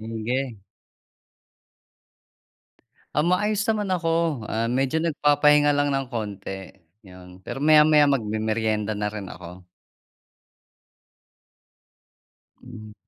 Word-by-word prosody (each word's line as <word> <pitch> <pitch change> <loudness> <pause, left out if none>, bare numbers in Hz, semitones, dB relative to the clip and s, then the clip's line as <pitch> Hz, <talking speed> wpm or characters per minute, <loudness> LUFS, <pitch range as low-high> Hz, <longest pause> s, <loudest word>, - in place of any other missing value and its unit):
sige. 115 +3 -3 2.6
Ah 150 - +2
maayos 205 +5 +1
naman 210 -2 0
ako, 165 -6 0
ah, 115 +1 -1
medyo 130 +5 0
nagpapahinga 150 -2 +3
lang 145 0 +1
ng 135 -1 -1
konti 100 -4 -6 0.3
'yun. 90 0 -14
Pero 135 - -6
maya-maya 150 -1 +5
magmemerienda 110 -3 -1
na 105 - -2
rin 100 -3 -7
ako. 90 +1 -11 3.0
Mm. 110 -4 -11
125 Hz, 85 wpm, -24 LUFS, 110-150 Hz, 3.0 s, maya-maya